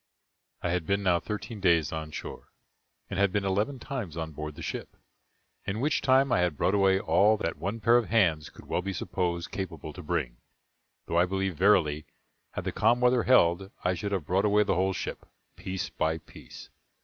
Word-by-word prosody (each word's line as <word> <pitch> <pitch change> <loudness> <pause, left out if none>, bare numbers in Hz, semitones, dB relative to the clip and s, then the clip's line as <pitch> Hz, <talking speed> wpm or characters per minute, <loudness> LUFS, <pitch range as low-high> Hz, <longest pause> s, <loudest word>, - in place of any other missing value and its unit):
I 85 - 0
had 85 -3 -1
been 100 +1 +1
now 90 -2 +3
thirteen 105 +4 -6
days 85 -5 +3
on 80 -1 -4
shore, - - -8 0.6
and 100 - -4
had 100 -1 +3
been 100 0 -1
eleven 105 +8 0
times 120 - -5
on 80 -1 -4
board 75 0 -6
the 80 - -8
ship, - - -6 0.7
in 100 +2 -3
which 145 +4 +1
time 135 0 +3
I 120 - +3
had 90 -5 0
brought 95 - +1
away 95 -1 +4
all 105 +2 +3
that 85 -7 -3
one 100 +7 -3
pair 115 +2 +5
of 120 - -1
hands 85 -9 +2
could - - -15
well - - -1
be 95 +1 -4
supposed 85 -1 -2
capable 80 -5 -5
to 90 - -9
bring; - - -2 0.7
though 85 - +1
I 90 - +4
believe 95 -1 -1
verily, 75 -5 +3 0.5
had - - -4
the - - -2
calm 120 - +3
weather 125 0 +4
held, 95 -6 +4
I 90 - +2
should 100 +3 -4
have 95 -6 -1
brought 95 +5 +1
away 105 0 +4
the - - 0
whole 95 +2 +1
ship, - - -5 0.3
piece 95 0 -5
by 80 +1 0
piece. - - -13
95 Hz, 200 wpm, -28 LUFS, 85-105 Hz, 0.7 s, pair